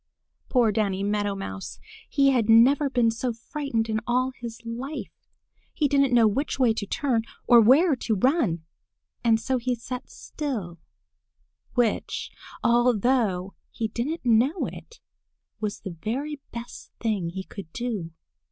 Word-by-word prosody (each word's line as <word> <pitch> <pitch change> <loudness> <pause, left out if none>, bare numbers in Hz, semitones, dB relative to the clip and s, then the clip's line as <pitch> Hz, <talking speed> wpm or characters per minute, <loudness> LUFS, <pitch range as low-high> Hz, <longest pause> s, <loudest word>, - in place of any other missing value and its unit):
Poor 240 -4 +3
Danny 200 -2 0
Meadow 205 0 0
Mouse! 95 - -6 0.3
He 275 -1 +4
had 235 -4 +1
never 265 +6 +6
been 245 -3 +3
so 240 +2 -2
frightened 230 -1 -3
in 220 -1 -1
all 255 +2 +1
his 235 -3 -8
life. 250 +6 -7 0.5
He 300 - +2
didn't 275 -1 +3
know 235 -2 +6
which 270 +8 -1
way 250 -4 +4
to 205 -2 -4
turn 250 0 0 0.2
or 240 -2 +7
where 280 +8 +5
to 230 -3 -1
run. 210 - +1 0.6
And 225 -2 +4
so 260 +3 -1
he 250 +1 -1
sat 250 +2 -7
still, 215 - -5 1.0
which, 240 -3 0 0.3
although 235 -5 +2 0.2
he 225 -1 -3
didn't 260 +7 -3
know 245 - +3
it, 470 - -10 0.6
was 210 -1 -3
the 190 - -6
very 280 +6 -3
best 235 +1 -8
thing 210 -7 -1
he 190 +2 -5
could 190 -4 -10
do. 220 -8 -3
235 Hz, 145 wpm, -26 LUFS, 215-265 Hz, 1.0 s, or